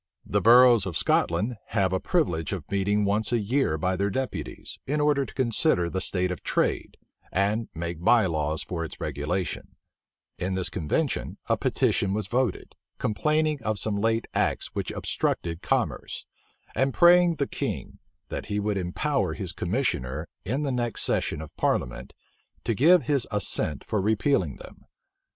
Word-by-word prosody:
The - - 0
boroughs 120 -3 +7
of 90 - -2
Scotland 105 +8 +1 0.2
have 95 -1 +2
a 95 - +1
privilege 90 - 0
of - - -5
meeting 100 +1 +1
once 105 +4 0
a 120 - +3
year 115 - +1
by 90 +3 0
their 100 +2 0
deputies, 95 - -4
in 150 +3 0
order 145 -2 +2
to - - -11
consider 115 - +1
the 95 - -1
state 90 -1 0
of 90 - -5
trade, - - -1 0.3
and 105 +4 0
make 85 0 -5
by 115 +1 +5
laws 80 -3 -1
for 85 -2 -4
its 80 - -7
regulation: 75 +6 -3 0.6
in 95 +1 -1
this 95 -1 -1
convention 80 -7 -1
a - - +3
petition 95 0 +1
was 105 -2 -2
voted, 125 +4 -1 0.2
complaining 150 +6 +1
of 110 -1 -1
some 105 0 -1
late 115 +1 +1
acts - - 0
which - - -3
obstructed 85 -1 -2
commerce; - - -1 0.5
and 135 0 +1
praying 175 -1 +6
the 140 - 0
king, - - -4 0.3
that - - -5
he 105 - -1
would 105 -1 0
empower 135 +11 -1
his 95 -5 -4
commissioner, 85 - -1 0.2
in 130 +9 -1
the 140 - -1
next 120 -2 -1
session 75 - 0
of 80 - -10
parliament, - - -1 0.5
to 115 - 0
give 160 - +5
his 140 -5 +1
assent 100 -8 -1
for 105 -3 -1
repealing 105 - +1
them. - - -13
105 Hz, 160 wpm, -26 LUFS, 90-130 Hz, 0.6 s, boroughs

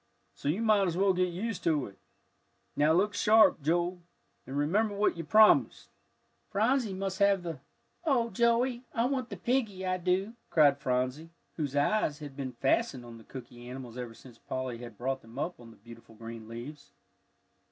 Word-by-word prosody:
So 140 - -4
you 190 +9 0
might 210 -3 +4
as 170 -1 -2
well 195 0 +3
get 180 0 +1
used 210 +4 -4
to 155 -5 +2
it. 100 - -12 0.8
Now 150 +2 +3
look 195 +5 +2
sharp, 215 -6 +5
Joe, 175 +4 0 0.5
and 135 +2 -4
remember 200 +9 +1
what 205 +1 +2
you 165 - -5
promised." 215 +7 +4 0.6
"Phronsie 225 +2 +1
must 190 0 -3
have 200 -2 +3
the 165 -3 -5 0.2
" - - -44
"Oh, 245 -7 +1
Joey, 235 +3 +2
I 230 - +2
want 255 -2 -1
the - - -6
piggie, 225 -7 -1
I 185 0 0
do," 185 +4 0 0.2
cried 145 -3 +4
Phronsie, 130 +4 -1 0.3
whose 145 -4 -3
eyes 150 0 +1
had 145 -3 -9
been 135 -2 -5
fastened 125 0 0
on 115 -1 -11
the - - -15
cooky 120 -1 -10
animals 125 -2 -8
ever 120 -2 -6
since 120 -2 -15
Polly 130 -2 -4
had 120 -3 -10
brought 130 +2 -2
them 115 +2 -15
up 170 +3 -3
on 120 -1 -13
the 115 - -16
beautiful 115 +1 -14
green 115 0 -9
leaves. 120 +6 -9
165 Hz, 185 wpm, -30 LUFS, 130-205 Hz, 0.8 s, sharp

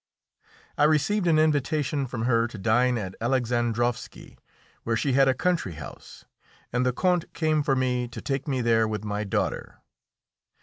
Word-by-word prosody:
I 150 - +6
received 175 +6 +2
an 160 -2 +4
invitation 150 -2 +1
from 120 -2 -4
her 115 -1 +2
to 110 - -10
dine 120 +4 +2
at 95 -4 -5
Alexandrovski, 120 -1 -1 0.5
where 115 0 -1
she 135 +3 0
had 135 +1 +5
a 130 - +3
country 175 - 0
house, 75 -3 -11 0.5
and 125 0 +1
the 125 - +2
Count 180 +5 0
came 155 -2 +1
for 140 -2 +1
me 125 -1 0
to 120 - -9
take 135 0 -3
me 130 -3 0
there 115 -1 +3
with 105 0 -4
my 105 0 -2
daughter. 100 - -3
125 Hz, 165 wpm, -26 LUFS, 115-145 Hz, 0.5 s, I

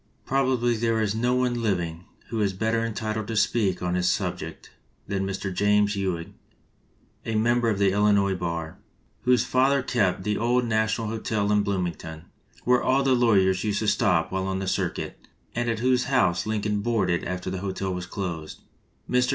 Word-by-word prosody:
Probably 130 -3 +1
there 115 0 +1
is 105 -2 0
no 120 +3 +1
one 125 -1 0
living 90 -5 -2 0.2
who 115 -2 -2
is 100 -2 +1
better 110 +4 0
entitled 110 -1 -3
to 115 - -3
speak 105 -4 +1
on 90 0 0
this 90 0 +2
subject - - -3 0.4
than 95 -1 -1
Mr. 95 0 -3
James 105 +1 +2
Ewing, 90 -4 -3 0.9
a 115 - -3
member 120 +2 +2
of 105 - 0
the 100 -1 +3
Illinois 100 -1 +3
bar, 85 -3 -4 0.5
whose 125 -2 +4
father 135 +1 +2
kept 100 -8 0
the 105 +1 -1
old 120 +2 +2
National 110 0 0
Hotel 110 -2 -1
in 105 0 +4
Blooming 95 -4 -1
ton, 80 0 -10 0.4
where 125 0 +3
all 135 +2 +2
the 135 -1 +3
lawyers 95 -7 +3
used 105 -2 0
to 110 - -1
stop 100 -5 +2
while 95 0 -1
on 95 0 -1
the 95 - -3
circuit, - - -3 0.3
and 120 0 -1
at 115 - 0
whose 125 +1 +2
house 95 -10 +2
Lincoln 105 -1 -1
boarded 100 -6 0
after 90 0 -4
the 95 - -3
hotel 95 0 -3
was 90 0 -5
closed. 85 -5 -5 0.5
Mr. 125 0 +2
105 Hz, 180 wpm, -25 LUFS, 95-115 Hz, 0.9 s, whose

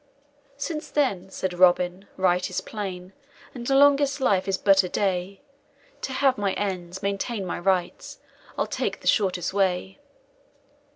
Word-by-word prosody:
"Since 305 +2 -4
then," 200 -11 0
said 190 -1 -3
Robin, 180 +1 +3
"right 180 0 +2
is 185 - -2
plain, 190 -3 -6 0.4
And 240 -1 -5
longest 280 +1 +4
life 200 -8 +2
is 195 -1 0
but 195 0 +5
a 180 - -5
day, 190 0 -1 0.6
To - - -4
have 260 -1 +2
my 200 -2 0
ends, 190 -2 -4
maintain 200 +1 -2
my 180 - -4
rights, 180 -1 -1 0.4
I'll - - +1
take - - -3
the - - -7
shortest 185 -4 +1
way." 180 - 0
195 Hz, 140 wpm, -25 LUFS, 180-235 Hz, 0.6 s, but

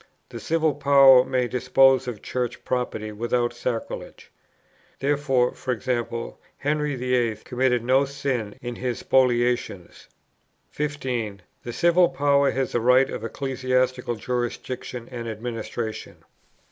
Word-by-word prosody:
The - - -7
Civil 160 -2 +1
Power 135 -2 +6
may 130 -1 0
dispose 130 +1 +3
of 115 -5 -6
Church 125 -1 -3
property 115 -4 -2
without 120 +3 -1
sacrilege. 120 -1 -5 0.7
Therefore, 135 -3 +1 0.2
e.g. 120 -1 -1 0.5
Henry 150 0 -1
VIII. 125 -3 0
committed 125 -1 0
no 130 +3 +3
sin 135 -6 -3
in 120 -1 -5
his 125 -2 -2
spoliations. 120 -7 0 0.6
15. 125 -9 -3 0.2
The 120 - -6
Civil 170 +3 +4
Power 140 0 +2
has 135 0 -1
the 120 - 0
right 125 +3 +4
of - - -5
ecclesiastical 130 0 -1
jurisdiction 120 +1 -4
and 120 -2 -6
administration. 110 0 -6
125 Hz, 115 wpm, -24 LUFS, 120-135 Hz, 0.7 s, Power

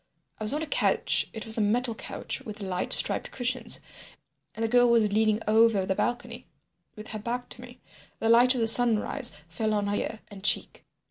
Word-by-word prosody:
I - - -5
was 215 - -1
on 310 - -3
a - - -3
couch—it 225 -6 -1
was 225 0 0
a - - +1
metal 230 +3 0
couch 220 - -7
with 210 -1 -9
light 190 -3 -4
striped - - +3
cushions—and 245 -2 -6
the - - +1
girl 245 +1 +3
was 220 -3 +2
leaning 215 0 +1
over 220 -2 +3
the 190 - -1
balcony 240 +3 -4 0.5
with 215 -1 -11
her 215 - -6
back 245 +3 -5
to 245 - -9
me. 250 0 -14 0.4
The 225 - -3
light 240 +3 +5
of 245 - -2
the 225 - +2
sunrise 235 +2 +5 0.2
fell 215 +6 -3
on 205 -1 -1
her 205 0 -2
ear 220 +1 -5
and 200 -2 -13
cheek. - - 0
225 Hz, 195 wpm, -26 LUFS, 215-245 Hz, 0.5 s, light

